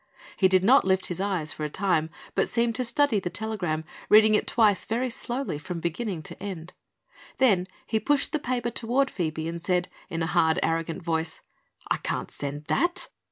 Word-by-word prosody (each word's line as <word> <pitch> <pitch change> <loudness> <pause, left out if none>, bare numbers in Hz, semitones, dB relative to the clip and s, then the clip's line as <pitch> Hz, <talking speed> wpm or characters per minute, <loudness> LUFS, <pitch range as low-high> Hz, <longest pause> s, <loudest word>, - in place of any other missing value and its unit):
He 190 - +4
did 185 0 +3
not 260 +7 +6
lift 190 0 +1
his 180 +1 -3
eyes, 185 -6 -1
for 155 - -6
a 150 - -1
time, 165 -2 +1 0.2
but - - +1
seemed 235 0 +1
to 255 - -1
study 240 -1 +2
the 180 - -3
telegram, 180 -7 -2 0.3
reading 215 0 +7
it 210 - +2
twice 215 -4 +3
very 245 +3 -1
slowly 240 - -3
from 170 +3 -5
beginning 170 +1 -3
to - - -8
end. 180 -4 -6 0.6
Then 200 -9 +3 0.2
he 220 - 0
pushed 285 +6 +1
the 310 - 0
paper 245 -3 -2
toward 250 +4 +1
Phoebe 160 -3 -2
and 170 0 -5
said 180 +1 0 0.2
in 165 0 -2
a 165 - -2
hard, 160 +2 +3
arrogant 165 +1 -1
voice: 160 -1 -2 0.5
"I - - +3
can't - - -3
send 145 +1 -5
that." 345 - +1
190 Hz, 190 wpm, -26 LUFS, 165-235 Hz, 0.6 s, reading